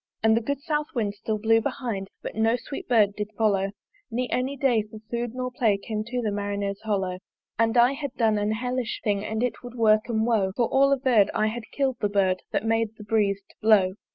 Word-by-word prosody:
And 220 Hz, 0 st, +5 dB
the 230 Hz, -, +2 dB
good 280 Hz, +4 st, -2 dB
south 300 Hz, 0 st, -1 dB
wind 210 Hz, -4 st, 0 dB
still 215 Hz, +1 st, -3 dB
blew 225 Hz, +1 st, +3 dB
behind, 220 Hz, -5 st, -3 dB, 0.2 s
But -, -, -5 dB
no 225 Hz, +2 st, +2 dB
sweet 275 Hz, +2 st, -7 dB
Bird 215 Hz, -4 st, +4 dB
did 210 Hz, 0 st, -4 dB
follow 200 Hz, -3 st, +2 dB, 0.4 s
Ne 250 Hz, +2 st, -1 dB
any 265 Hz, +3 st, -1 dB
day 250 Hz, -5 st, +3 dB
for 215 Hz, +1 st, -11 dB
food 235 Hz, 0 st, -3 dB
or 255 Hz, 0 st, -3 dB
play 225 Hz, -5 st, +2 dB
Came 215 Hz, +1 st, -4 dB
to 245 Hz, +1 st, -3 dB
the 215 Hz, -, 0 dB
Marinere's 200 Hz, -1 st, -3 dB
hollo! 195 Hz, -4 st, -1 dB, 0.4 s
And 230 Hz, +1 st, +2 dB
I 240 Hz, +2 st, +6 dB
had 275 Hz, -1 st, -5 dB
done 220 Hz, -3 st, +2 dB
an 210 Hz, +1 st, 0 dB
hellish 250 Hz, +1 st, -2 dB
thing 205 Hz, -2 st, 0 dB
And 220 Hz, +2 st, -2 dB
it 250 Hz, -, -2 dB
would 245 Hz, 0 st, -9 dB
work 215 Hz, -1 st, +3 dB
'em 220 Hz, -1 st, +1 dB
woe: 210 Hz, -5 st, +1 dB
For 240 Hz, -, +2 dB
all 275 Hz, +1 st, +3 dB
averr'd, 250 Hz, -7 st, +3 dB
I 215 Hz, -, +2 dB
had 225 Hz, +1 st, -4 dB
kill'd 270 Hz, -3 st, 0 dB
the 205 Hz, -, 0 dB
Bird 190 Hz, -2 st, +1 dB
That 215 Hz, -, -1 dB
made 225 Hz, -1 st, 0 dB
the 210 Hz, -, -10 dB
Breeze 205 Hz, -2 st, +1 dB
to -, -, -21 dB
blow. 205 Hz, -4 st, +4 dB
220 Hz, 225 wpm, -25 LUFS, 205-245 Hz, 0.4 s, I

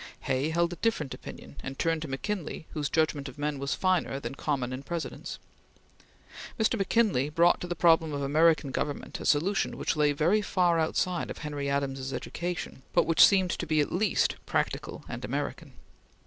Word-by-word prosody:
Hay 135 Hz, +3 st, 0 dB
held 170 Hz, +1 st, +1 dB
a -, -, -8 dB
different 160 Hz, -, -1 dB
opinion 70 Hz, +1 st, -10 dB
and 135 Hz, +5 st, -6 dB
turned 165 Hz, -1 st, 0 dB
to 160 Hz, -, -4 dB
McKinley 160 Hz, +4 st, -4 dB
whose 150 Hz, -2 st, -2 dB
judgment 155 Hz, -3 st, 0 dB
of 130 Hz, -, -13 dB
men 145 Hz, -1 st, -2 dB
was 140 Hz, 0 st, -1 dB
finer 185 Hz, -7 st, +1 dB
than 140 Hz, -, -5 dB
common 135 Hz, -3 st, -2 dB
in 130 Hz, -, -5 dB
Presidents. 165 Hz, +3 st, -5 dB, 1.2 s
Mr. 220 Hz, +2 st, +3 dB
McKinley 195 Hz, -, +2 dB
brought 170 Hz, +3 st, +3 dB
to 180 Hz, -, -4 dB
the 175 Hz, -, -3 dB
problem 165 Hz, -2 st, +4 dB
of 140 Hz, -1 st, -3 dB
American 155 Hz, 0 st, +3 dB
government 145 Hz, +2 st, -3 dB
a -, -, -3 dB
solution 180 Hz, +7 st, +1 dB
which -, -, -1 dB
lay 150 Hz, -1 st, +3 dB
very 165 Hz, +9 st, +2 dB
far 175 Hz, -4 st, +2 dB
outside 175 Hz, +2 st, 0 dB
of -, -, -6 dB
Henry 145 Hz, -2 st, -4 dB
Adams's 135 Hz, -1 st, -2 dB
education, 175 Hz, -5 st, -4 dB
but -, -, +4 dB
which 165 Hz, 0 st, +6 dB
seemed 190 Hz, -3 st, +5 dB
to 170 Hz, -, -3 dB
be 155 Hz, 0 st, +2 dB
at 145 Hz, -, +1 dB
least 205 Hz, +5 st, +1 dB
practical -, -, -2 dB
and -, -, -6 dB
American. -, -, -4 dB
155 Hz, 180 wpm, -28 LUFS, 140-175 Hz, 1.2 s, which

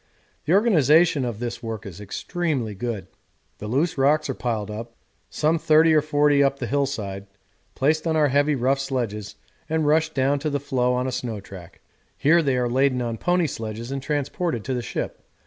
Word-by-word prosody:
The 155 Hz, -, +2 dB
organisation 165 Hz, -, +4 dB
of 120 Hz, -4 st, -3 dB
this 120 Hz, 0 st, -5 dB
work 115 Hz, -3 st, -5 dB
is 100 Hz, -1 st, -9 dB
extremely 135 Hz, -, -3 dB
good. 105 Hz, -2 st, -4 dB, 0.5 s
The 105 Hz, -, -6 dB
loose 140 Hz, +7 st, 0 dB
rocks 145 Hz, +1 st, +3 dB
are -, -, -3 dB
pulled 110 Hz, -5 st, -3 dB
up, 115 Hz, +2 st, -7 dB, 0.3 s
some 160 Hz, +2 st, +1 dB
30 160 Hz, +1 st, +5 dB
or 155 Hz, -, +5 dB
40 145 Hz, -1 st, +2 dB
feet -, -, +5 dB
up 140 Hz, 0 st, +1 dB
the 130 Hz, -, -4 dB
hillside, 110 Hz, -8 st, -2 dB, 0.5 s
placed 155 Hz, +4 st, +1 dB
on 160 Hz, -, +1 dB
our 150 Hz, -2 st, +3 dB
heavy 145 Hz, +2 st, +2 dB
rough 135 Hz, +2 st, +1 dB
sledges 115 Hz, -7 st, -3 dB, 0.3 s
and 160 Hz, -1 st, 0 dB
rushed 160 Hz, +1 st, +2 dB
down 140 Hz, +1 st, +2 dB
to 155 Hz, +2 st, -2 dB
the 145 Hz, -1 st, -1 dB
floe 125 Hz, -2 st, 0 dB
on 125 Hz, +1 st, -1 dB
a 130 Hz, -, -2 dB
snow 115 Hz, -4 st, -4 dB
track; 95 Hz, -3 st, -12 dB, 0.4 s
here 165 Hz, +4 st, +4 dB
they 135 Hz, -4 st, +1 dB
are 125 Hz, -1 st, +1 dB
laden 130 Hz, +1 st, +2 dB
on 115 Hz, -2 st, -3 dB
pony 175 Hz, -1 st, +2 dB
sledges 115 Hz, -2 st, -5 dB
and 135 Hz, 0 st, -3 dB
transported 145 Hz, -, -2 dB
to 130 Hz, -, -3 dB
the 125 Hz, -, -1 dB
ship. -, -, -5 dB
135 Hz, 195 wpm, -24 LUFS, 115-150 Hz, 0.5 s, 30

